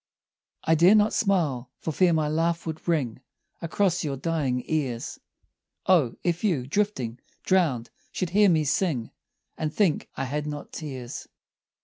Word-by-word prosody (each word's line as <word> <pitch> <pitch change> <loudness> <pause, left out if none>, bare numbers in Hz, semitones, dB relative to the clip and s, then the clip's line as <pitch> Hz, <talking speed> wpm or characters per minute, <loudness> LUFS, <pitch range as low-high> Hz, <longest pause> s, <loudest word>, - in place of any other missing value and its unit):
I 160 - +3
dare 175 +6 +6
not 210 0 +4
smile 155 - +1
for 160 - -3
fear 180 +3 +3
my 155 -2 +2
laugh 165 +2 0
would 160 0 -6
ring 135 -8 0 0.4
Across 175 +1 +1
your 140 -3 -2
dying 140 -5 -1
ears; 135 -7 -2 0.7
O, 160 -11 +4
if 175 +1 0
you, 165 -12 +1
drifting, 130 - -1 0.2
drowned, 155 -11 +1 0.2
should 180 -2 -2
hear 205 +1 +5
me 160 -3 +3
sing 145 -5 0 0.5
And 155 -1 -1
think 185 -3 +1
I - - -1
had 150 +3 -3
not 145 -1 -6
tears. 130 -6 -6
160 Hz, 145 wpm, -26 LUFS, 135-180 Hz, 0.7 s, dare